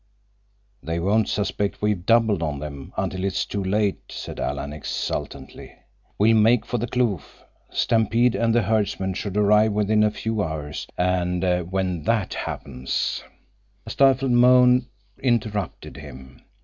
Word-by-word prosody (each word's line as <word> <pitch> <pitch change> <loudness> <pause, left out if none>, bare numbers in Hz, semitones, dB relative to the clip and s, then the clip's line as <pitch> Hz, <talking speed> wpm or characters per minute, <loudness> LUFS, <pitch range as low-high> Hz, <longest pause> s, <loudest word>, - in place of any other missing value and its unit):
"They 80 +1 -3
won't 105 +6 +1
suspect 100 0 -2
we've 105 -4 0
doubled 115 -5 +3
on 75 -3 -2
them 70 -2 -8
until 95 0 -2
it - - +1
is - - -1
too 100 -1 -4
late," 100 +1 0
said - - -7
Alan 70 +1 -3
exultantly. 75 - -5 0.4
"We'll 110 +2 +4
make 115 +2 +4
for 120 - -2
the 120 - -2
kloof. 120 -7 -2 0.3
Stampede 115 +2 +2
and 115 -1 +1
the 120 - +3
herdsmen 100 -2 0
should 100 +2 -4
arrive 105 +1 +4
within 105 +1 +2
a 105 - +4
few 110 0 -3
hours, 75 -4 -4
and 90 0 0 0.3
when 95 -3 -1
that 110 -3 0
happens—" 65 -1 -3 0.6
A - - -7
stifled 135 -1 +3
moan 125 +1 +5 0.3
interrupted 110 -5 -2
him. 65 0 -12
105 Hz, 140 wpm, -23 LUFS, 90-115 Hz, 0.6 s, moan